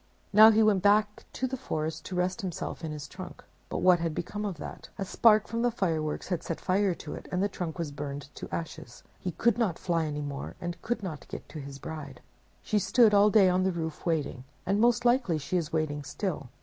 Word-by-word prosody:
Now 215 +2 +10
he 220 0 +5
went 205 -3 +4
back 210 +2 +3
to 260 - -2
the 260 +1 -2
forest 160 -10 -3
to 185 - -5
rest 180 +4 0
himself 180 -2 -5
in 160 - -3
his 150 -2 -6
trunk. 185 +3 -9 0.3
But - - -3
what 180 -1 +6
had 165 -2 -2
become 210 +5 -4
of 195 -5 -3
that? - - -8
A 195 - -2
spark 215 +2 +5
from 230 0 -2
the 245 - +3
fireworks 165 -10 -2
had 180 -4 -1
set 165 - -4
fire 190 -1 +1
to 150 - -8
it, - - -8
and 180 +1 +1
the - - +3
trunk 180 -4 -5
was 165 -4 -3
burned 140 -1 -6
to - - -8
ashes. 140 -7 -6 0.2
He 180 - -3
could 235 +5 +2
not 195 -8 +1
fly 165 -3 0
any 150 0 -3
more, 140 -1 -5
and 175 0 -5
could 230 -1 -2
not 160 -6 -6
get - - -8
to 155 - -7
his 140 -1 -8
bride. 140 -2 -7 0.4
She 210 - +1
stood 225 +2 +4
all 205 +1 +6
day 210 -3 +6
on 180 0 +3
the 190 0 +2
roof 160 -3 -4
waiting; 150 -6 -1 0.2
and 200 +3 +1
most 240 0 +3
likely 240 -9 +3
she 150 +4 -4
is 165 -4 0
waiting 155 -2 -1
still. 150 - -4
180 Hz, 230 wpm, -29 LUFS, 155-210 Hz, 0.4 s, Now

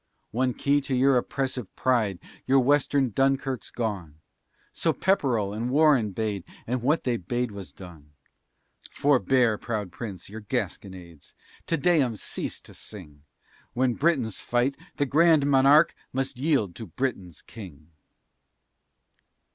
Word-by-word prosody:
One 125 +2 0
key 145 +1 +2
to 135 -1 -2
your 135 +1 +4
oppressive 130 -2 -2
pride 115 -7 +1 0.3
Your 135 +1 +5
Western 140 -1 +2
Dunkirk's 135 -1 0
gone; 100 -10 -4 0.6
So 165 - 0
Pepperell 125 - +1
and 115 +3 -3
Warren 140 -5 +4
bade 105 -2 -3 0.2
And 125 +1 -2
what 145 +7 +1
they 120 -2 0
bade 120 +5 -2
was 100 -2 -9
done! 80 -6 -13 0.8
Forbear, 130 -5 +2
proud 105 -6 -4
Prince, 95 -1 -7
your 110 +3 -9
gasconades, 90 -6 -5 0.3
Te 165 - +1
Deums 140 - +2
cease - - -5
to - - -15
sing, 75 -9 -11 0.5
When 125 0 +1
Britains 135 - 0
fight 125 +3 0 0.2
the 145 - 0
Grand 155 +1 +4
Monarque 140 +2 +5 0.2
Must 135 +1 -2
yield 130 - 0
to 115 - -7
Britain's 95 -5 -4
King. 85 -8 -12
125 Hz, 130 wpm, -26 LUFS, 100-135 Hz, 0.8 s, Your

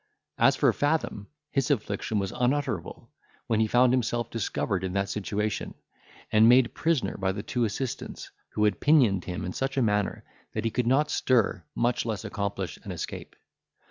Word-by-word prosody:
As - - +5
for - - +3
Fathom, 145 -9 -1 0.2
his 135 +2 0
affliction 105 -4 -1
was 95 -1 -1
unutterable, 125 - -1 0.3
when 110 -2 +1
he 110 - +3
found 125 +2 +4
himself 120 -2 0
discovered 95 -4 -2
in 95 -1 -3
that 100 0 0
situation, 105 0 -2 0.6
and 110 +1 +6
made 125 0 +5
prisoner 160 -5 0
by 95 -1 0
the 100 +1 -5
two 120 +1 0
assistants, 115 +4 -5 0.2
who 105 - 0
had 105 -3 +2
pinioned 125 - +4
him 90 0 -4
in 90 - -4
such 135 +1 -2
a - - +3
manner, 105 -2 0 0.3
that 110 +1 -3
he 115 - +1
could 125 0 -1
not 150 +4 +3
stir, 115 -8 +2
much 120 +1 +1
less 110 -1 -3
accomplish 100 -3 -3
an - - -7
escape. - - -6
110 Hz, 175 wpm, -27 LUFS, 100-125 Hz, 0.6 s, and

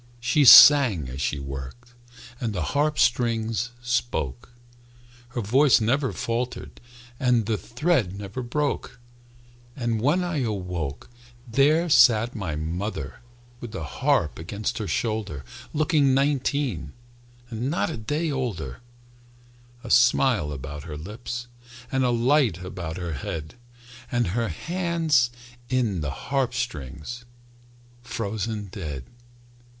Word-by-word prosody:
She 140 +5 +2
sang 115 - +9
as 65 +2 -6
she 70 - -1
worked, 70 - -8 0.5
And 115 -3 -2
the 90 -4 -2
harp 150 +1 +1
strings 115 -1 +1
spoke; 120 - -2 0.8
Her 120 0 -4
voice 130 +5 +4
never 130 +5 +1
faltered, 120 +2 -4 0.4
And 125 -4 +2
the 110 +1 0
thread 120 - 0
never 100 +5 -6
broke. 125 -1 -2 0.8
And 120 -4 -1
when 155 +9 +2
I 175 -3 -2
awoke,– 90 - -4 0.4
There 145 +8 +3
sat 120 -6 +5
my 90 -8 -3
mother 80 -1 -4 0.4
With 120 -2 -8
the 95 - -4
harp 75 +3 0
against 100 +8 -4
her 105 - -3
shoulder 100 - -2 0.3
Looking 150 -3 +2
nineteen 135 - 0 0.6
And 120 +4 -2
not 165 +1 0
a - - -4
day 150 +9 -2
older, 105 - -4 1.0
A 120 - -6
smile 120 - +4
about 70 +1 -6
her 75 -2 -6
lips, 115 +8 -6 0.5
And 130 0 +1
a 125 - +2
light 120 - +2
about 90 -3 -6
her 85 -3 -4
head, 75 +3 -5 0.6
And 120 -6 +1
her 115 +5 -1
hands 165 - +1 0.4
in 115 -9 0
the 75 - -2
harp 125 - -2
strings 95 - -5 0.8
Frozen 110 -2 -4
dead. 75 - -6
115 Hz, 120 wpm, -25 LUFS, 90-130 Hz, 1.0 s, sang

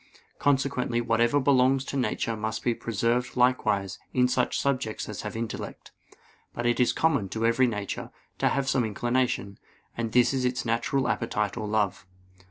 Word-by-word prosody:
Consequently 135 -4 +1
whatever 120 +3 +2
belongs 130 -1 +3
to - - -5
nature 125 -3 -1
must 110 0 -3
be 120 - +2
preserved 115 +3 -1
likewise 110 -6 +1 0.2
in 125 -1 +4
such 125 0 0
subjects 130 -6 -1
as 105 - -5
have 105 - -6
intellect. 115 0 -6 0.6
But 120 - -3
it 120 +1 +2
is 125 - +4
common 140 -12 +1
to 110 +3 -2
every 115 +3 +4
nature 105 -4 -4 0.3
to - - +3
have 140 0 -1
some 130 -2 +2
inclination; 120 -2 -1 0.4
and 115 -1 -3
this 125 +3 +4
is 130 -1 0
its 125 -1 -1
natural 120 +4 0
appetite 105 -3 -1
or 110 -3 -4
love. 105 -3 -1
120 Hz, 165 wpm, -27 LUFS, 110-130 Hz, 0.6 s, in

